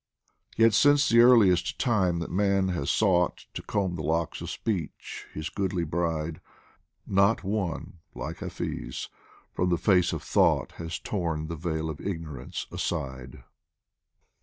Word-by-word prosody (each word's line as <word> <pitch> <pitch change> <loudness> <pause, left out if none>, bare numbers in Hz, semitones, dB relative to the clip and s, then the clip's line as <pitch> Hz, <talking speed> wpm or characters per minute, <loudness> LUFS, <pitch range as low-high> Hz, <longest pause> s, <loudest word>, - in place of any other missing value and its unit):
Yet 115 0 +5
since 145 +6 +5
the 115 - +5
earliest 105 -8 +5
time 95 -8 +1
that 85 - -4
man 100 0 +2
has 80 -7 -2
sought 90 -5 +2
To - - -5
comb 100 -4 -1
the 85 - -4
locks 80 +1 -1
of - - -5
Speech, 95 -10 -4
his 75 +2 -5
goodly 95 -3 -1
bride, 80 -1 -2 0.6
Not 100 +3 +3
one, 95 -4 -3 0.2
like - - -5
Hafiz, - - -5 0.4
from 90 - 0
the 85 - +2
face 90 -2 +3
of - - -4
Thought - - +2
Has 85 0 -4
torn 85 -6 -2
the 85 - -3
veil 80 -1 -3
of 80 -2 -6
Ignorance 80 -9 -5
aside. 65 -2 -4
90 Hz, 140 wpm, -27 LUFS, 80-100 Hz, 0.6 s, Yet